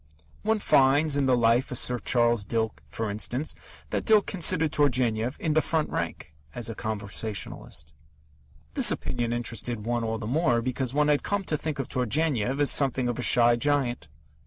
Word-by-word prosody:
One 220 +1 +1
finds 145 -4 +3
in 140 -2 +1
the 125 -1 +3
Life 115 +3 +2
of 125 - -1
Sir 125 0 +2
Charles 120 -1 +2
Dilke, 110 +1 -3
for 115 - -4
instance, 125 +8 -2 0.4
that - - -1
Dilke 215 -2 +4
considered 160 -4 +2
Turgenev 125 -3 +1
"in 155 - -1
the 155 - +3
front 160 -1 -1
rank" 75 - -5 0.2
as 120 -1 -2
a - - -5
conversationalist. 100 -8 -4 0.8
This - - +5
opinion 120 -1 -2
interested 120 -2 -3
one 120 0 -1
all 110 0 -2
the 110 - -7
more 120 -2 +1
because 130 0 -2
one 150 0 +2
had 145 -1 +2
come 200 -1 -2
to 160 - -1
think 155 0 -4
of 135 - -4
Turgenev 130 0 0
as 145 - +3
something 135 -3 +2
of 120 - -4
a - - -1
shy 120 -1 +5
giant. 125 - -1
125 Hz, 180 wpm, -26 LUFS, 115-145 Hz, 0.8 s, This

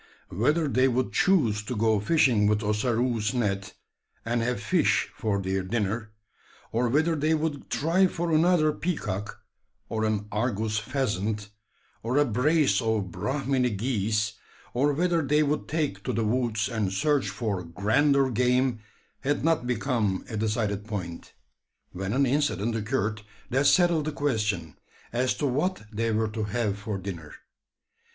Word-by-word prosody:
Whether 150 - +1
they 130 -1 +3
would 130 0 0
choose 120 - +3
to 115 +4 -5
go 110 -1 +2
fishing 115 -3 +3
with 105 +1 +1
Ossaroo's 110 +1 0
net, 100 -4 -1 0.5
and 120 +1 0
have 125 +1 -1
fish 175 -5 +1
for 105 -4 -1
their 95 0 -1
dinner, 105 +2 -2 0.6
or 120 +1 +1
whether 160 +6 +2
they 155 +2 +2
would 155 -2 -3
try 175 +6 +3
for 170 -1 -3
another 160 -1 +4
peacock, 105 - -4 0.5
or 110 -1 -1
an 105 -1 -1
argus 110 -1 -1
pheasant, 105 -4 -2 0.5
or 120 +4 -1
a 145 - +5
brace 140 +5 +2
of 110 -5 -1
Brahminy 135 - 0
geese; 105 -1 -1 0.4
or 140 +4 +2
whether 170 +2 +1
they 150 +1 +2
would 150 +1 -1
take 155 -2 -2
to 125 - -1
the 115 -1 0
woods 115 -1 0
and 110 -5 -1
search 140 +1 +1
for 100 -2 -3
grander 130 - +2
game, 125 +1 +2 0.4
had 145 +1 -1
not 165 -7 +2
become 115 -5 0
a 110 - -6
decided 105 -2 -1
point; 90 -6 -6 0.6
when 95 +2 -4
an 140 +1 +3
incident 125 -6 0
occurred 110 -1 -1 0.3
that 135 +3 +3
settled 170 -4 +4
the 155 - -1
question, 105 - -1 0.4
as 125 +2 +1
to 150 - -2
what 150 - 0
they 115 +2 0
were 110 0 +1
to 110 0 -3
have 105 -1 -1
for 105 -1 -4
dinner. 90 -5 -7
115 Hz, 150 wpm, -27 LUFS, 105-140 Hz, 0.6 s, a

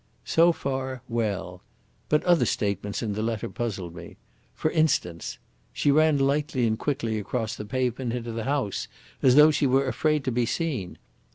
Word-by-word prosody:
So 170 +1 +5
far 130 -4 -4
well. 100 -6 -2 0.5
But 150 - +3
other 175 -2 +4
statements 100 +1 -2
in 105 -3 -2
the 105 - -3
letter 110 -1 -2
puzzled 100 -8 -4
me. - - -11 0.4
For 155 - -1
instance, 130 - 0 0.4
'She 145 - +2
ran 155 0 +4
lightly 140 -2 +1
and 110 0 0
quickly 115 -6 -1
across 110 +2 -3
the 105 - -7
pavement 125 +1 -1
into 120 -1 -4
the 115 -1 -4
house, 135 -7 -1 0.3
as 130 -1 +5
though 150 +1 +8
she 145 -2 +1
were 135 +2 +3
afraid 150 +4 +1
to 130 - -1
be 120 0 +1
seen.' 135 - -2
125 Hz, 170 wpm, -26 LUFS, 110-145 Hz, 0.5 s, though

